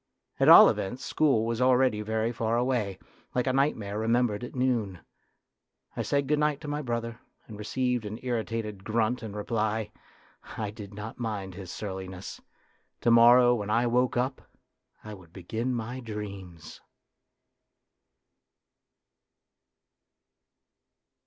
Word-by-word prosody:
At - - +5
all - - +11
events, 100 +7 -2
school 135 -8 +2
was 115 +1 -2
already 125 -4 +3
very 110 +2 -1
far 115 0 -1
away, 120 -6 0 0.4
like 125 - +1
a 130 - +1
night 140 +3 +2
mare 105 -1 -5
remembered 115 0 +1
at 125 - -8
noon. 120 -8 0 1.0
I - - -2
said 140 -1 0
good 150 +1 +1
night 150 -1 +1
to 150 - -8
my 145 +1 -2
brother, 115 -3 -4 0.3
and 105 -2 -11
received 125 +2 -1
an 105 +1 -6
irritated 115 -4 -3
grunt 115 +3 0
in 110 -3 -7
reply. 110 0 -2 0.7
I 105 -2 -3
did 105 -2 -10
not 105 +3 -8
mind 105 -5 -4
his 95 -1 -9
surliness; 95 -2 -7 0.6
to 120 - +3
morrow 120 +1 +7
when 105 -4 -3
I 115 +3 +2
woke 125 +1 +1
up, 130 +2 -1 0.6
I 105 - -8
would 90 -5 -14
begin 110 +8 -4
my 120 +2 -4
dreams. 100 -8 -8
115 Hz, 135 wpm, -28 LUFS, 105-125 Hz, 1.0 s, all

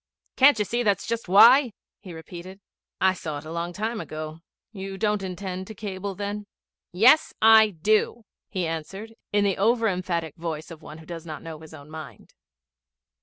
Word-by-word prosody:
'Can't 270 -2 +6
you 210 - 0
see 240 +4 -1
that's 205 -5 +1
just 230 -3 -3
why?' 235 +6 +7 0.3
he 190 - -11
repeated. 175 +3 -10 0.4
'I 190 0 +4
saw 155 -5 -5
it 145 - -9
a 160 - -8
long 170 +1 -3
time 220 +4 -3
ago. 155 +1 -7 0.3
You 195 -2 -7
don't 210 -1 0
intend 185 0 -5
to 220 - -9
cable 200 -1 -5
then?' 205 +1 -5 0.4
'Yes, 245 - +4
I 220 -1 +7
do,' 215 +5 0 0.2
he 185 -4 -2
answered, 190 +7 -6 0.2
in 205 0 +2
the 195 -2 +1
over 225 +3 +2
emphatic 175 -5 -2
voice 160 -1 -5
of 160 - -10
one 150 - -10
who 160 - -14
does 170 0 -8
not 155 -2 -7
know 160 -2 -8
his 160 0 -12
own 145 +2 -14
mind. 155 -1 -10
190 Hz, 180 wpm, -25 LUFS, 165-215 Hz, 0.4 s, why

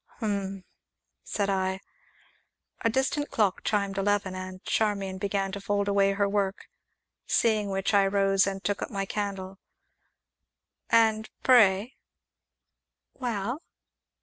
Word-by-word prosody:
"Hum!" 200 -4 -3 0.6
said 200 -2 -1
I. 190 -1 0 1.0
A 230 - +3
distant 265 +4 0
clock 205 -4 +1
chimed 200 -2 0
eleven, 200 -1 +1
and 185 0 -7
Charmian 200 -3 -1
began 195 -1 -1
to 200 +1 -6
fold 200 0 0
away 200 -1 +3
her 200 0 +1
work, 200 -1 -1 0.6
seeing 215 -3 +2
which, 195 +1 -1
I 200 -1 +5
rose, 195 -1 +3
and 195 -1 -4
took 205 - -1
up - - -3
my 195 -2 -2
candle. 195 -1 -4 1.3
"And 220 -1 +3
pray 225 -2 +4 0.5
" - - -60
"Well?" 240 +3 -2
200 Hz, 120 wpm, -27 LUFS, 195-210 Hz, 1.3 s, I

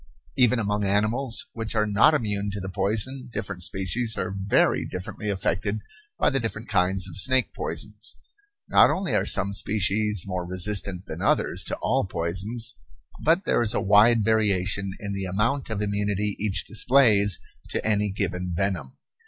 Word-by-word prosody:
Even 125 -2 +4
among 105 -2 -1
animals 110 +5 0
which 115 -1 -5
are 105 -1 +2
not 105 +10 +4
immune 105 -6 -1
to 100 0 -5
the 95 0 -5
poison 110 +7 -1
different 95 -4 -5
species 95 +6 -1
are - - -3
very 100 +1 +2
differently 90 +3 -5
affected 100 +2 -1 0.4
by - - +2
the 135 - +1
different 115 -1 -4
kinds 95 +1 +1
of 85 - -10
snake 130 -2 +3
poisons. 105 +1 -4 0.5
Not - - +6
only 190 -1 -1
are - - +1
some 100 +1 0
species 105 -1 +1
more 90 -2 -3
resistant 95 +1 -1
than - - -7
others - - +1
to - - -2
all - - +1
poisons, 100 +8 -2 0.5
but 165 +5 +3
there - - +1
is 110 -3 +1
a - - +2
wide 105 +3 +5
variation 100 -3 +1
in 100 -1 -5
the 95 -1 -3
amount 105 +10 -1
of 105 -2 -2
immunity 105 0 -1
each 105 -2 -2
displays 110 -5 +3 0.3
to - - -3
any 105 -1 +1
given 90 -2 -3
venom. 85 -7 -2
105 Hz, 160 wpm, -25 LUFS, 95-110 Hz, 0.5 s, Not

